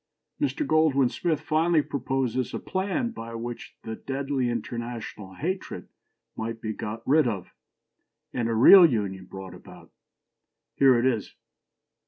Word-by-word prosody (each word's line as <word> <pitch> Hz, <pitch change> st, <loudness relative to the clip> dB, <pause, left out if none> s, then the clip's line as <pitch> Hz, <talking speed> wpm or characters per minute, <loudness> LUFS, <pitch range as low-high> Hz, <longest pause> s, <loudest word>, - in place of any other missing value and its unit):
" -, -, -28 dB
Mr. 295 Hz, +1 st, 0 dB
Goldwin 150 Hz, -, +3 dB
Smith 165 Hz, -4 st, -1 dB
finally 155 Hz, 0 st, +2 dB
proposes 130 Hz, -2 st, -2 dB
a -, -, -3 dB
"plan" 200 Hz, +6 st, -2 dB
by 115 Hz, -, -8 dB
which 120 Hz, +1 st, -7 dB
the 110 Hz, 0 st, -5 dB
"deadly 135 Hz, -1 st, -2 dB
international 115 Hz, -4 st, -5 dB
hatred" 185 Hz, -, -4 dB, 0.5 s
might 115 Hz, +1 st, -4 dB
be 110 Hz, -1 st, -4 dB
got 105 Hz, +1 st, -6 dB
rid 150 Hz, 0 st, +4 dB
of, 100 Hz, -6 st, -4 dB, 0.8 s
and 120 Hz, -2 st, -1 dB
a 115 Hz, -, 0 dB
"real 180 Hz, -, +9 dB
union" 100 Hz, -, +1 dB
brought 95 Hz, -1 st, -9 dB
about. -, -, -14 dB, 0.8 s
Here 135 Hz, -3 st, +5 dB
it 120 Hz, -, +1 dB
is. 120 Hz, -5 st, -1 dB
125 Hz, 140 wpm, -26 LUFS, 115-155 Hz, 0.8 s, real